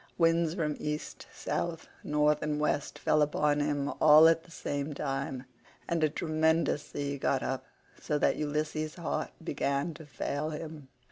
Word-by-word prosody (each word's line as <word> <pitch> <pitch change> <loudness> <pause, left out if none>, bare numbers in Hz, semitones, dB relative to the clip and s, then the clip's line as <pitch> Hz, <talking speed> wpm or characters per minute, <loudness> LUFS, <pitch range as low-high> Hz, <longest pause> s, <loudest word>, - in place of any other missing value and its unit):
Winds 165 -1 +3
from 150 -5 -1
East, 150 0 -4
South, 170 -1 -3 0.2
North, 150 0 +2
and 150 -1 -1
West 150 -1 -1
fell 155 - +2
upon 150 0 +2
him 145 -1 0
all 155 +1 +9
at 165 0 +4
the - - -17
same 145 -2 -3
time, 135 -2 -3 0.4
and 170 -2 0
a 155 - +4
tremendous 160 0 +1
sea 140 -1 -3
got 135 0 +1
up, 130 0 -3 0.4
so 150 - 0
that - - +2
Ulysses' 155 +1 -2
heart 170 -2 -2
began 140 0 -1
to 160 -1 -12
fail 145 +1 -3
him. 155 -2 -7
150 Hz, 155 wpm, -30 LUFS, 145-160 Hz, 0.4 s, all